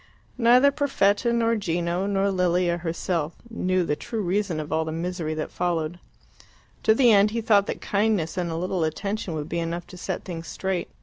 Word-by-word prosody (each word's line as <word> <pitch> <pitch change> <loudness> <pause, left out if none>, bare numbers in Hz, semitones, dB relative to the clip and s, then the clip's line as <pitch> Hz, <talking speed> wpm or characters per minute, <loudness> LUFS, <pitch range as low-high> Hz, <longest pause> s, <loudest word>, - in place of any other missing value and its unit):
Neither 250 +4 +6
Perfetta, 240 -6 +2
nor 230 -1 +2
Gino, 175 -1 -1
nor 200 0 +1
Lilia 180 -1 +1
herself 170 -1 -2 0.2
knew 185 -4 +1
the 150 -3 0
true 220 +7 -4
reason 185 -2 0
of 150 0 -6
all 160 0 +2
the 160 - -4
misery 165 -1 -3
that 155 - -4
followed. 175 -1 -2 0.8
To 220 - +4
the 245 -1 +5
end 205 0 +5
he 230 +2 -2
thought 205 -3 +3
that - - -4
kindness 200 -5 0
and 180 -2 -1
a 165 - -3
little 180 +1 -1
attention 190 +3 -2
would 150 -1 -4
be 170 +1 -2
enough 170 +1 -3
to 180 - -12
set - - -4
things 170 -3 -6
straight. 190 -2 -3
180 Hz, 190 wpm, -25 LUFS, 170-210 Hz, 0.8 s, Neither